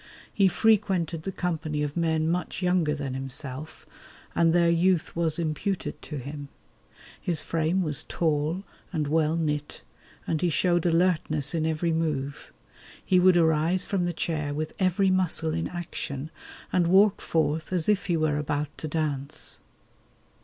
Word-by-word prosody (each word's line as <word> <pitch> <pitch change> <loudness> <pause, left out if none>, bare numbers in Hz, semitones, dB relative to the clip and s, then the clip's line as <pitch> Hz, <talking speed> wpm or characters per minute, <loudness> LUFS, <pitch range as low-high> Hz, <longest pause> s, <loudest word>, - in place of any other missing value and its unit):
He 195 -2 +4
frequented 185 -5 +2
the 195 - -4
company 160 -5 -2
of 145 -1 -3
men 160 -2 +1
much 180 +2 -2
younger 180 -4 +2
than 140 -3 -4
himself, 135 +2 -5 0.5
and 165 -1 +3
their 170 0 +4
youth 170 0 +2
was 165 -2 0
imputed 170 +4 -2
to 150 - -6
him. 140 +2 -7 0.7
His 170 -4 0
frame 165 +3 0
was 150 -2 +2
tall 160 +3 -1 0.3
and 155 -5 -1
well 155 +1 +2
knit, 150 -3 -2 0.4
and 160 - -1
he 175 - +2
showed 175 +1 +2
alertness 165 -4 +1
in 160 -1 0
every 160 +1 0
move. 150 -4 -2 0.5
He 185 - +4
would 180 0 +6
arise 165 +2 +2
from 190 -3 0
the 175 - 0
chair 155 -3 -2
with 155 +1 -3
every 190 +1 +2
muscle 175 -4 +1
in 165 0 -1
action, 160 -4 -5 0.4
and 175 -2 +3
walk 195 +3 +5
forth 160 0 0
as 175 -4 0
if 210 -2 +2
he 175 -3 +2
were 155 -2 +1
about 150 0 -2
to 155 - -3
dance. 145 -3 -3
160 Hz, 155 wpm, -27 LUFS, 150-175 Hz, 0.7 s, would